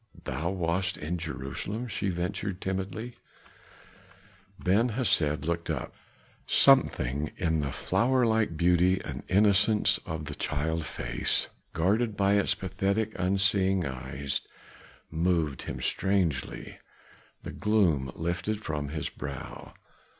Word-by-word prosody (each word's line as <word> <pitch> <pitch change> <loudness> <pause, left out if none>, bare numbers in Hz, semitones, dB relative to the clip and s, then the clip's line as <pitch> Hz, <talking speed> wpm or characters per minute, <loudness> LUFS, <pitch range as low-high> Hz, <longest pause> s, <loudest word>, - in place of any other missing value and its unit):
"Thou 75 +6 -2
wast 95 0 0
in 85 +4 -3
Jerusalem?" 80 - -4
she 100 -3 -1
ventured 95 +2 -2
timidly. 95 +6 -4 1.4
Ben 105 +7 +2
Hesed 95 - +1
looked 85 0 -2
up; - - -3 0.5
something 70 +4 +4
in 80 -2 +1
the 70 -2 -1
flower 125 - +2
like 110 -7 +1
beauty 90 +2 +4
and - - -5
innocence 105 +2 +4
of 80 -1 -4
the 75 - -5
child 80 +3 -2
face, - - -1 0.2
guarded 105 +6 +1
by 100 0 +3
its 100 -1 +3
pathetic, 100 +3 -1
unseeing 95 0 +3
eyes, 65 +1 -3 0.7
moved 80 -4 0
him 65 - -5
strangely. 85 +1 -1 0.6
The - - -6
gloom 85 -12 +2
lifted 90 +6 -2
from 75 -2 -3
his 75 -1 -3
brow. 70 -3 -8
90 Hz, 115 wpm, -28 LUFS, 75-100 Hz, 1.4 s, something